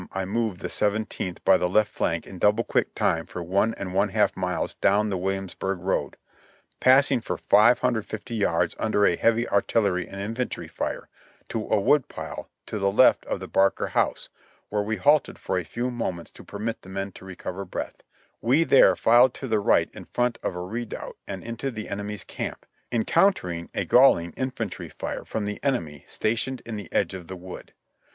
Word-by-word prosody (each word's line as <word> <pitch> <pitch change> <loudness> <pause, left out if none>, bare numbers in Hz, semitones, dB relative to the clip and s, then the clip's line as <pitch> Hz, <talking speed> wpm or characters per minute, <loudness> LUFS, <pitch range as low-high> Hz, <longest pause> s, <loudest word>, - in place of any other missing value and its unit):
I 95 0 -2
moved 105 -2 -2
the - - -4
Seventeenth 105 -3 -1
by - - +6
the 90 - 0
left 105 +1 +3
flank 85 -2 -1
in 95 - -10
double 105 0 +3
quick - - -1
time 80 0 0
for 90 - -6
one 100 +6 +1
and 95 -2 -6
one 100 +2 +2
half 105 +2 +2
miles - - -2
down 105 +2 +2
the 95 - -1
Williamsburg 95 +1 -2
road, 95 +2 -2 0.6
passing 130 0 +5
for - - -3
500 110 -1 +2
yards 85 -6 +1
under 105 -2 +2
a 85 - +4
heavy 115 +5 +2
artillery 100 -3 +1
and 100 - -8
infantry 115 +5 -3
fire - - -4 0.4
to 110 -2 -3
a 110 - +2
wood 145 +7 +3
pile - - -7 0.2
to 105 - -4
the 100 0 +2
left 125 +6 +4
of - - -2
the - - -7
Barker 95 0 +2
house, - - 0 0.4
when 105 0 -1
we 110 +1 -1
halted 145 0 +3
for 95 - -1
a - - -4
few 120 +9 -3
moments 95 -8 -4
to - - -13
permit 110 +3 -5
the 95 - -14
men 95 +1 -4
to - - -14
recover 95 0 -6
breath; 90 - -6 0.4
we 130 +8 +3
there 140 - +6
filed 120 +2 +5
to 135 - -6
the 110 -3 +2
right 100 - +3
in - - -10
front 125 -1 -1
of - - -3
a 90 - -4
redoubt 115 +5 -6
and 95 -2 -6
into 115 +4 -4
the 110 -4 -6
enemy's 105 +1 -5
camp, - - -6 0.3
encountering 110 - +1
a - - -1
galling 85 -10 +5
infantr}^ 125 -2 -4
fire - - -5
from 110 -2 -3
the 105 0 -4
enemy 85 - -1
stationed 120 +4 -2
in 115 - -5
the 105 -2 -8
edge 95 - +1
of 90 -3 -8
the 95 - -7
wood. 90 0 -10
105 Hz, 190 wpm, -25 LUFS, 95-115 Hz, 0.6 s, by